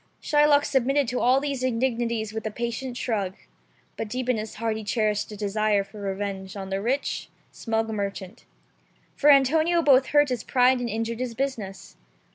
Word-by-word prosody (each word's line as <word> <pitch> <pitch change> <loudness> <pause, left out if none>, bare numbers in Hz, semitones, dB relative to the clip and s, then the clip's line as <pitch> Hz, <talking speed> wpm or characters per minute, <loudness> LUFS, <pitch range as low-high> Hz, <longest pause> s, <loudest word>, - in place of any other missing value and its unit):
Shylock 295 -1 +3
submitted 270 +1 +1
to 250 - -1
all 255 +2 +4
these 280 -2 -3
indignities 235 -3 -1
with 220 0 -3
a - - -1
patient 240 +3 -4
shrug; 200 -7 -2 0.6
but 225 - -3
deep 250 +3 -4
in 250 - +2
his 215 0 -6
heart 225 -1 -1
he 220 - -5
cherished 210 -1 0
a 210 - -8
desire 210 0 +1
for 205 +1 -12
revenge 195 -1 -4
on 195 -1 -6
the 195 0 -1
rich, 260 +6 -2 0.2
smug 225 -1 -2
merchant. 200 -1 -5 0.7
For 295 - +3
Antonio 315 +5 +4
both 265 -3 +5
hurt 290 -1 +4
his 245 -3 -2
pride 255 0 +3
and 245 -1 -3
injured 230 +1 -3
his 250 -2 -3
business. 230 -8 -4
230 Hz, 175 wpm, -25 LUFS, 210-260 Hz, 0.7 s, both